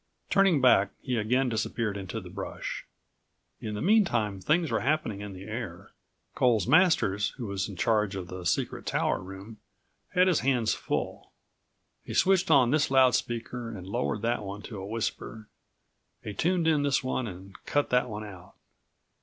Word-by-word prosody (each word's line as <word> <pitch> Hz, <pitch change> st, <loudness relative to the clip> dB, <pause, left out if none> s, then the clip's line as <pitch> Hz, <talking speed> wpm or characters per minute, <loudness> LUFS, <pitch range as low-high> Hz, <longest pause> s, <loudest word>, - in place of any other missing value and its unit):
Turning 195 Hz, -6 st, +4 dB
back, 110 Hz, -6 st, +5 dB
he 125 Hz, -, -1 dB
again 125 Hz, +4 st, +1 dB
disappeared 110 Hz, -2 st, -2 dB
into 100 Hz, +2 st, -5 dB
the 95 Hz, -, -11 dB
brush. -, -, -6 dB, 0.7 s
In 105 Hz, -1 st, -5 dB
the 105 Hz, -, -3 dB
meantime 120 Hz, -, +2 dB
things 160 Hz, -, +1 dB
were -, -, +1 dB
happening 135 Hz, -8 st, -1 dB
in 105 Hz, -1 st, -7 dB
the 95 Hz, +1 st, -9 dB
air. 105 Hz, -4 st, -7 dB, 0.4 s
Coles 115 Hz, -7 st, +2 dB
Masters, 105 Hz, -, +3 dB
who 125 Hz, -, -5 dB
was 100 Hz, +1 st, -3 dB
in 100 Hz, -, -8 dB
charge 105 Hz, +2 st, +1 dB
of 95 Hz, -2 st, -4 dB
the 90 Hz, 0 st, -7 dB
secret 90 Hz, +1 st, -1 dB
tower -, -, +1 dB
room, 95 Hz, +4 st, -10 dB, 0.6 s
had 180 Hz, +1 st, +5 dB
his 180 Hz, -5 st, +3 dB
hands 125 Hz, -3 st, +1 dB
full. -, -, -4 dB, 0.7 s
He -, -, -7 dB
switched 190 Hz, -1 st, +3 dB
on 130 Hz, -6 st, +5 dB
this 150 Hz, 0 st, +2 dB
loud 130 Hz, -2 st, +5 dB
speaker 120 Hz, 0 st, -3 dB
and 100 Hz, -5 st, -8 dB
lowered 110 Hz, +1 st, -2 dB
that68 120 Hz, 0 st, 0 dB
one 100 Hz, +1 st, -6 dB
to 110 Hz, -, -8 dB
a 95 Hz, -, -6 dB
whisper. 110 Hz, 0 st, -4 dB, 0.8 s
He 105 Hz, -, -5 dB
tuned 175 Hz, -, +1 dB
in 155 Hz, -3 st, +3 dB
this 140 Hz, -2 st, +1 dB
one 130 Hz, -1 st, -2 dB
and 95 Hz, 0 st, -10 dB
cut 145 Hz, 0 st, +1 dB
that 125 Hz, 0 st, +2 dB
one 105 Hz, -1 st, -5 dB
out. 95 Hz, -3 st, -11 dB
115 Hz, 170 wpm, -28 LUFS, 100-135 Hz, 0.8 s, back